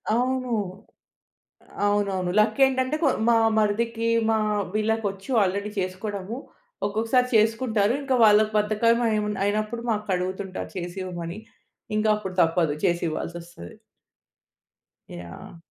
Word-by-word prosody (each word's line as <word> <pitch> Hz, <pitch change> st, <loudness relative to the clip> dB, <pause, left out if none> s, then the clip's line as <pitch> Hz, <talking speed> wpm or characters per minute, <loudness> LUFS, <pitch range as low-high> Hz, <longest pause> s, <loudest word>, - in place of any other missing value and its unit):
అవును. 255 Hz, +1 st, 0 dB, 1.4 s
అవునవును. 200 Hz, -3 st, 0 dB
లక్ 215 Hz, +3 st, +2 dB
ఏంటంటే 260 Hz, +2 st, 0 dB
కొ -, -, +5 dB, 0.2 s
మా 235 Hz, -, +5 dB, 0.2 s
మరిదికి 225 Hz, +2 st, 0 dB, 0.2 s
మా 220 Hz, -, +3 dB, 0.4 s
వీళ్ళకొచ్చు 215 Hz, 0 st, -1 dB
ఆల్రెడీ 200 Hz, +2 st, -1 dB
చేసుకోవడము. 195 Hz, +3 st, -4 dB, 0.5 s
ఒక్కొక్కసారి 225 Hz, +5 st, +1 dB
చేసుకుంటారు. 220 Hz, -1 st, +2 dB
ఇంకా 270 Hz, -2 st, 0 dB
వాళ్ళకి 215 Hz, 0 st, +5 dB
బద్ధకం 215 Hz, +3 st, +2 dB
అయి 215 Hz, -1 st, +1 dB, 0.2 s
అయినప్పుడు 215 Hz, +3 st, -1 dB
మాకడుగుతుంటారు 190 Hz, -2 st, -3 dB
చేసి 175 Hz, +1 st, -5 dB
ఇవ్వమని. 175 Hz, +1 st, -6 dB, 0.6 s
ఇంకా 215 Hz, 0 st, +2 dB
అప్పుడు 190 Hz, -3 st, -6 dB
తప్పదు 165 Hz, -2 st, +2 dB
చేసి 175 Hz, 0 st, +1 dB
ఇవ్వాల్సొస్తది. 170 Hz, -, -7 dB, 1.4 s
యాహ్! 85 Hz, -, -10 dB
210 Hz, 105 wpm, -25 LUFS, 185-225 Hz, 1.4 s, కొ